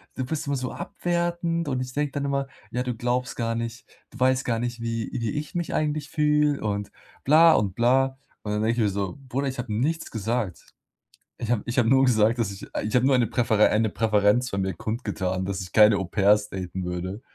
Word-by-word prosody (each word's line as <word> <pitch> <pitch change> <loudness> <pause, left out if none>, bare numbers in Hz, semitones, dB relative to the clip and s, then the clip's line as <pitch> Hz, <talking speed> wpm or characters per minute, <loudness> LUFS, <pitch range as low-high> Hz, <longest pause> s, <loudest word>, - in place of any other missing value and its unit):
du 130 - -2
bist 150 +2 -4
immer 140 - 0
so 125 -1 -3
abwertend 170 -1 -2
und 130 -2 -1
ich 125 0 -6
denke 145 -1 -1
dann 140 0 -2
immer 140 -1 -1 0.2
ja, 125 - -1
du 125 -2 -3
glaubst 125 +1 -1
gar 115 -1 -1
nicht 115 0 -5 0.3
du 125 - -13
weißt 130 0 +2
gar 115 -2 0
nicht, 120 -1 -4
wie 115 -1 -3
wie 115 -2 -2
ich 150 +1 -5
mich 170 -2 -2
eigentlich 150 -2 -1
fühle 150 -1 +2
und 100 -1 -2 0.3
bla 160 +3 +7
und 95 -3 +1
bla." 130 +3 +2 0.3
Und 105 -1 -3
dann 105 - 0
denke 115 +1 +2
ich 120 -2 +1
mir 105 - +2
so: 100 +3 -3
„Bruder, 135 +3 -1
ich 130 -2 -4
habe 120 -3 -4
nichts 155 +9 -1
gesagt. 110 -4 -3 0.7
Ich 115 - -2
habe 115 -4 +1
ich 120 - -3
habe 115 - +3
nur 135 0 +5
gesagt, 115 0 +3
dass 105 -4 0
ich 95 - -9 0.2
ich 105 - -2
habe 125 +1 +4
nur 140 - +4
eine 120 -3 +2
Präfere 110 -3 +3
eine 110 0 +2
Präferenz 110 +2 +2
von 100 - -2
mir 95 0 -1
kundgetan, 95 -3 -3
dass 100 0 -3
ich 90 - -8
keine 105 -1 +6
Au-pairs 105 +2 +2
daten 95 -1 -5
würde, 90 +5 -4
120 Hz, 220 wpm, -25 LUFS, 105-135 Hz, 0.7 s, bla